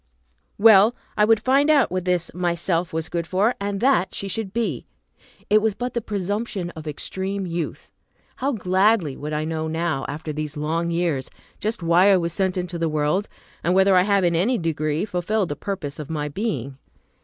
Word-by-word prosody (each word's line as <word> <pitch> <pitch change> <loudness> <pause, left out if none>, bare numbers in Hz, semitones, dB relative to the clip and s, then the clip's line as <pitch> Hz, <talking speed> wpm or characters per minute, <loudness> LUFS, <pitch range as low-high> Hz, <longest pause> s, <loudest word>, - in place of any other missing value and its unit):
Well, 215 +1 +7 0.2
I 210 - +4
would 225 0 +4
find 270 +6 +3
out 285 - +4
what 185 -1 -2
this 180 -2 0
Myself 175 -1 -1
was 160 0 -2
good 170 -1 -3
for, 200 +7 +2
and 200 0 -2
that 260 -7 +2
she 200 - -3
should 200 0 -3
be! 205 - -2 0.6
It 215 +1 +4
was 220 -2 0
but 245 +2 -4
the 235 - -1
presumption 205 -2 -3
of 160 -2 -10
extreme 190 +6 -3
youth. 170 -2 -5 0.5
How 275 +2 0
gladly 190 - +2
would 150 +1 -6
I 150 0 -1
know 160 0 -2
now, 160 -3 -1
after 155 +2 -5
these 150 0 -4
long 165 +3 -1
years, 165 -6 -1 0.3
just 215 -3 -2
why 175 +4 +5
I 195 - +6
was 170 -2 -2
sent 190 0 0
into 180 -1 -3
the 165 -1 0
world, 155 +6 0 0.3
and 175 +2 +2
whether 190 0 +5
I 180 - +6
have 200 0 +2
in 170 -1 +2
any 220 +9 +2
degree 155 -1 -1
fulfilled 200 +1 -1
the 145 - -3
purpose 170 -8 -5
of 150 - -7
my 150 -2 -2
being! 140 - -3
180 Hz, 190 wpm, -23 LUFS, 160-205 Hz, 0.6 s, Well